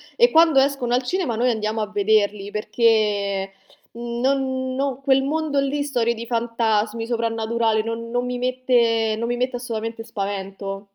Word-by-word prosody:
e 480 0 +5
quando 320 -4 +6
escono 270 -3 +1
al 250 +1 +2
cinema 335 -4 -1
noi 245 +3 +2
andiamo 220 0 -2
a 210 - -2
vederli 205 -1 +1
perché, 210 -3 +1 0.4
mhmm, 235 0 -5
non 260 -1 0
no 270 -1 -2
quel 270 -1 +3
mondo 295 0 0
lì, 280 +1 0
storie 240 -5 0
di 230 0 -7
fantasmi, 230 -1 0
soprannaturale, 225 -1 0
non 230 +1 -5
non 245 +1 -1
mi 250 0 -3
mette 240 -3 +1
non 230 +1 -2
mi 240 - -1
mette 250 0 -1
assolutamente 225 -1 -5
spavento. 195 -2 -5
235 Hz, 160 wpm, -22 LUFS, 220-255 Hz, 0.4 s, quando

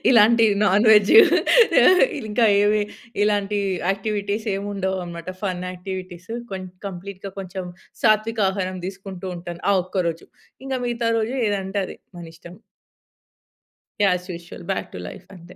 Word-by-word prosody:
ఇలాంటి 230 0 +6 0.2
non 205 +2 +3
veg, 210 - +7 1.1
ఇంకా 220 +2 +2 0.2
ఏమి 210 0 +3 0.4
ఇలాంటి 205 0 +1 0.3
యాక్టివిటీసేముండవనమాట, 195 -4 -3
ఫన్ 185 -2 -2
యాక్టివిటీస్. 185 0 -8 0.2
కొం 190 -1 -5 0.2
కంప్లీట్‌గా 195 +1 -7
కొంచెం 185 -1 -6 0.4
సాత్వికహారం 205 -4 +1
తీసుకుంటూ 190 -1 -8
ఉంటాను, 175 0 -8
ఆ - - +4
ఒక్కరోజు. 175 -3 -3 0.4
ఇంకా 265 -1 -2
మిగతా 235 -1 -1
రోజు 225 +3 -2
ఏదంటే 200 0 -2
అది. - - -9 0.2
మనిష్టం. 165 +2 -12 1.5
As 180 -2 +2
usual. 170 0 -10
Back 195 - -3
to 90 - -7
life - - -11
అంతే. 175 +1 -14
195 Hz, 110 wpm, -22 LUFS, 180-210 Hz, 1.5 s, veg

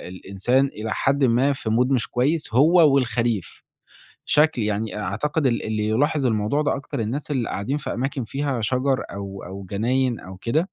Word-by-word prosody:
الإنسان 110 +9 +1
إلى 110 -5 -4
حدٍ 140 +1 +1
ما 130 +3 +3
في 115 -4 -5
mood 125 +4 +2
مش 125 -5 +1
كويس 140 0 -1
هو 155 +3 +6
والخريف. 115 -6 -1 0.6
شكْل 150 -5 +3
يعني 105 +1 -2
أ - - -4
أعتقد 145 - -1
ال 120 -3 +1
اللي 110 -1 -1
يلاحِظ 135 +4 +1
الموضوع 110 +6 +1
ده 145 - 0
أكتر 135 -3 -5
الناس 130 +8 -3
اللي 130 -5 -1
قاعدين 130 +9 -2
في - - -5
أماكن 135 +1 -2
فيها 135 0 -2
شجَر 130 +4 0
أو 100 -1 -7
أو 95 +1 -8
جناين 120 +3 0
أو 95 +1 -10
كده. 115 +10 0
125 Hz, 180 wpm, -23 LUFS, 110-140 Hz, 0.6 s, هو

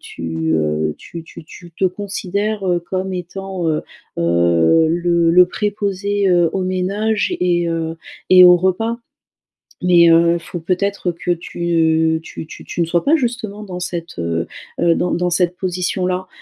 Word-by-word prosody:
tu, 80 -1 -4
heu, 75 0 0
tu 170 -1 -9
tu 170 0 -13
tu 170 +2 -13
te 190 - +1
considères, 200 +1 -2
heu, 175 -1 +1
comme 185 +2 -4
étant, 185 0 -4
heu, 155 - 0 0.4
heu, 85 - +3
le 170 0 +2
le 180 +1 +6
préposé, 200 0 -1
heu, 175 -2 +4
aux 190 - -1
ménages 200 +4 -1
et 175 -1 +1
heu 165 0 -3 0.3
et 185 0 +9
aux 180 0 +8
repas, 205 +6 -1 0.8
mais, 175 -2 +5
heu, 170 +1 +4
faut 175 +1 -7
peut-être 185 +1 -1
que 175 +1 -5
tu 160 -2 +1
tu 160 - -9
tu - - -11
tu - - -5
ne 165 - +2
sois 170 +1 0
pas 300 +3 +4
justement 230 -7 -2
dans 185 -3 -7
cette, 170 - -5
heu, 85 0 -2 0.3
heu, 170 -1 +4
dans 180 - -1
dans 180 +1 0
cette 180 0 +1
position 180 0 -2
là. 185 0 -2
175 Hz, 165 wpm, -18 LUFS, 165-190 Hz, 0.8 s, et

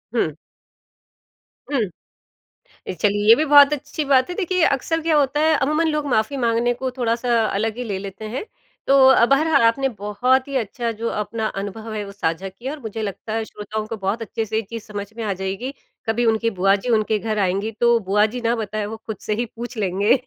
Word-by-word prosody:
हुँ। 155 -10 0 1.4
हुँ। 275 - +1 1.1
अ, - - -2
चलिए 205 0 +1
ये 225 - +11
भी 310 - +1
बहुत 290 0 +7
अच्छी 295 +2 -4
बात 265 0 +3
है 355 - -4
देखिए 365 -3 0
अक्सर 325 +4 0
क्या 320 0 +2
होता 285 0 +2
है 315 0 +4
अमूमन 305 +4 +2
लोग 300 -1 -1
माफ़ी 245 +3 +1
माँगने 235 0 +1
को 260 +2 -3
थोड़ा-सा 240 -1 0
अलग 215 +2 -1
ही 250 - -3
ले 200 -4 -3
लेते 200 +2 -8
हैं। 270 - -3 0.4
तो 275 - +5
अब 265 0 +5
हर 300 -1 +3
आपने 270 +4 +3
बहुत 250 +6 +1
ही 275 - -5
अच्छा 230 +1 -2
जो 230 - 0
अपना 215 +1 -2
अनुभव 215 +3 -6
है 210 - -3
वो 200 - -9
साझा 190 -1 -2
किया 245 +8 -7
और 310 - -8
मुझे 225 -3 -5
लगता 215 +1 -5
है 225 0 -1
श्रोताओं 215 +1 -5
को 225 - -5
बहुत 200 +4 -2
अच्छे 225 +1 -3
से 220 +1 -5
ये 220 - +2
चीज़ 230 -2 -6
समझ 205 -2 -6
में 230 - -3
आ 200 -2 -1
जाएगी। 195 +8 -4 0.3
कभी 235 +2 +1
उनकी 225 0 +2
बुआ 195 +1 +5
जी 205 +5 -5
उनके 215 0 0
घर 215 0 -2
आएँगी, 195 +3 0
तो 235 +1 +3
बुआ 210 +1 +2
जी 240 +3 -4
ना 235 +1 +1
बताए, 215 -1 -3
वो 220 +1 -6
खुद 220 -1 -7
से 210 - +1
ही 240 +2 -1
पूछ 240 +2 -8
लेंगे, 200 +2 +2
225 Hz, 215 wpm, -21 LUFS, 210-260 Hz, 1.4 s, ये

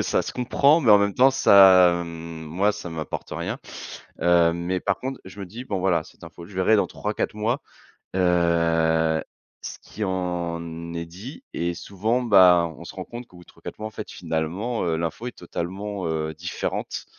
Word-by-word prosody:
heu, - - +2
ça - - +1
se - - -6
comprend, 140 +5 +3
mais 120 -8 +3
en 105 - +9
même 100 0 +1
temps, 130 +2 +6
ça 95 -8 +6
mmh, 85 -1 -8
moi 95 +7 +1
ça 90 - -7
m'apporte 80 -3 -5
rien. - - -4 0.6
Heu, 85 -1 +4
mais 90 +2 -2
par 95 +1 -1
contre, 135 +1 -5
je 95 +2 -11
me 100 - -5
dis: 115 +8 -9
«Bon 95 -5 -2
voilà, 90 -2 +1
cette - - -18
info, 85 - -11
je 100 - -14
verrai 95 +4 +4
dans 105 - +2
3-4 105 0 -3
mois». 110 +6 -1 0.6
Heu, 85 -3 +2 0.4
ce - - -7
qui 105 - -6
en 85 -2 -3
est 85 0 -4
dit 110 - -10
et 85 +1 -1
souvent, 110 +8 -1
ben, 90 -7 +5
on 85 - -10
se - - -10
rend 95 -1 -6
compte 120 0 -9
qu'au 90 - -17
bout 90 - -14
de - - -45
3-4 - - -10
mois 110 - -4
en - - -14
fait - - -8
finalement, 90 +9 -3
heu, 80 -2 0
l'info 85 +8 -4
est 125 - -8
totalement, 95 +2 -5
heu, 80 -1 -2
différente 85 +3 -4
90 Hz, 200 wpm, -24 LUFS, 85-105 Hz, 0.6 s, en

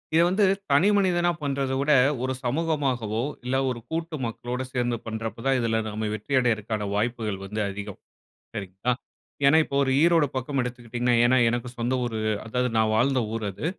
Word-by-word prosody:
இத 165 - +6
வந்து 195 +3 +3 0.3
தனி 155 +8 +5
மனிதனா 175 -3 +2
பண்றத 135 -2 -1
விட, 145 +2 +1 0.3
ஒரு 130 0 0
சமூகமாகவோ! 130 -6 0 0.2
இல்ல 125 +1 -1
ஒரு 120 -2 -3
கூட்டு 165 -1 -3
மக்களோட 120 +2 -4
சேர்ந்து 120 -1 0
பண்றப்ப 115 0 -4
தான், 135 -1 +3
இதில 115 -1 +1
நாம 110 0 -3
வெற்றி 110 +6 -5
அடையிறக்கான 110 -3 -1
வாய்ப்புகள் 110 -2 -1
வந்து 105 +3 -5
அதிகம். 100 0 -7 0.6
சரிங்களா! 100 +3 -2 0.5
ஏன்னா, 150 +3 +6
இப்போ 140 - -5
ஒரு 130 - 0
ஈரோடு 165 -3 +4
பக்கம் 130 +2 -2
எடுத்துக்கிடீங்கன்னா 120 0 -1
ஏன்னா, 130 +1 +4
எனக்கு 120 +1 -2
சொந்த 120 +2 -1
ஊரு 115 -2 -3 0.3
அதாவது 125 +2 0
நான் 110 0 +3
வாழ்ந்த 130 +3 +3
ஊர் 115 -2 -3
அது. 120 - -7
125 Hz, 165 wpm, -25 LUFS, 110-140 Hz, 0.6 s, இத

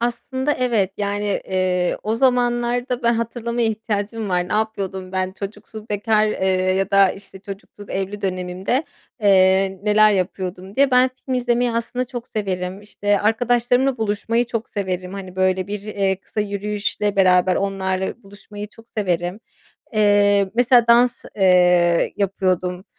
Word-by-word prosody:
Aslında, 260 +4 -1
evet. 230 -8 0
Yani, 205 0 -1
ııı, 180 -1 0
o 215 +1 -1
zamanlarda 245 0 +1
be 235 - +2
hatırlamaya 235 0 -1
ihtiyacım 215 0 -3
var. 180 -1 0
Ne - - -4
yapıyordum 195 -3 -2
ben? 185 0 -1
"Çocuksuz 210 +2 -9
bekâr, 215 +1 +2
ııı, 185 -2 +1
ya 195 0 -1
da, 195 -1 +5
işte, 195 -1 -11
çocuksuz 200 +1 -10
evli 195 +2 -4
dönemimde, 185 0 -3 0.5
ııı, 190 -1 +4
neler 210 0 +5
yapıyordum?" 185 0 -3
diye. 275 +2 +3
Ben 255 +1 +4 0.2
film 260 - -1
izlemeyi 245 -1 +1
aslında 235 +2 -2
çok 245 -1 -8
severim, 190 -2 -3
işte, 205 -1 -1
arkadaşlarımla 245 +4 +1
buluşmayı 220 +2 0
çok 230 -1 -4
severim. 185 -2 -4
Hani, 190 -2 -8
böyle, 185 0 +1
bir, 205 0 -5
eee, 200 -2 -1
kısa 210 - -5
yürüyüşle 205 0 -2
beraber 185 -1 +4
onlarla 190 +2 -2
buluşmayı 205 +1 -10
çok 225 +1 -19
severim. 180 -2 -2 0.5
Eee, 205 -2 +3
mesela 245 0 +4
dans, 235 +1 +4
eee, 180 -3 +4
yapıyordum. 185 -2 -1
205 Hz, 140 wpm, -21 LUFS, 190-230 Hz, 0.5 s, da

